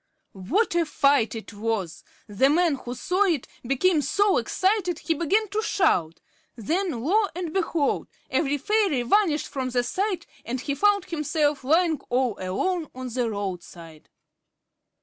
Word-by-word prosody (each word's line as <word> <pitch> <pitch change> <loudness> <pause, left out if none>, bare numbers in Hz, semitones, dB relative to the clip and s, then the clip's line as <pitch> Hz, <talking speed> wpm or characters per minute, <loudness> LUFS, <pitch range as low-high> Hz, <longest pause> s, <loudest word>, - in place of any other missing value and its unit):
What 300 - 0
a 345 0 +3
fight 285 -7 +2
it 225 0 -8
was! 205 -5 -3 0.2
The 225 +6 +2
man 335 +1 +3
who 250 -2 -6
saw 370 +9 +1
it 325 -9 0
became 295 +6 +2
so 405 +6 +2
excited 375 -3 0
he 330 - -1
began 385 +8 +1
to 420 +2 -1
shout. 180 - +1 0.3
Then, 310 - -2
lo 405 +8 +3
and 345 -3 -4
behold! 330 -6 0 0.2
every 290 -2 0
fairy 380 - +1
vanished 315 - +2
from 260 -2 -3
sight, 340 - -1 0.2
and 250 +2 -4
he 280 +2 -2
found 405 +5 +2
himself 300 -3 -1
lying 320 +2 +2
all 250 -3 +1
alone 310 - -2
on 255 0 -5
the 240 -1 -1
roadside. 175 -6 -7
295 Hz, 145 wpm, -25 LUFS, 240-365 Hz, 0.3 s, a